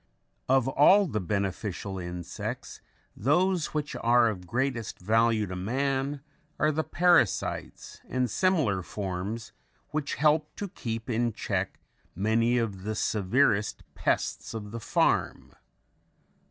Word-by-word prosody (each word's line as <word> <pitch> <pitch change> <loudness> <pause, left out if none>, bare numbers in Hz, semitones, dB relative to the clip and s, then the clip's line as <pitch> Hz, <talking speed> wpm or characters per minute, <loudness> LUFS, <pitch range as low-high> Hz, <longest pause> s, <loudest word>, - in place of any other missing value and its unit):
Of 130 -1 +4
all 180 +10 +6
the 110 - -2
beneficial 100 0 -3
insects 90 -1 -6 0.3
those 175 - +2
which 150 -2 -3
are 120 0 +5
of 90 -4 -6
greatest 120 -1 -2
value 110 +2 +2
to 95 -1 -6
man 135 +7 -1 0.4
are 155 - +3
the 160 +1 -1
parasites 175 - +1
and 130 -1 +1
similar 145 - +1
forms 100 +4 -4 0.4
which 150 -2 -2
help 150 0 +2
to 205 - -5
keep 115 -7 -5
in 120 -1 0
check 100 -4 -2 0.4
many 115 +5 +2
of 105 -5 -2
the 110 +3 -3
severest 105 +1 +1
pests - - -1
of 105 -2 -6
the 115 - -5
farm. - - 0
115 Hz, 120 wpm, -28 LUFS, 100-140 Hz, 0.4 s, all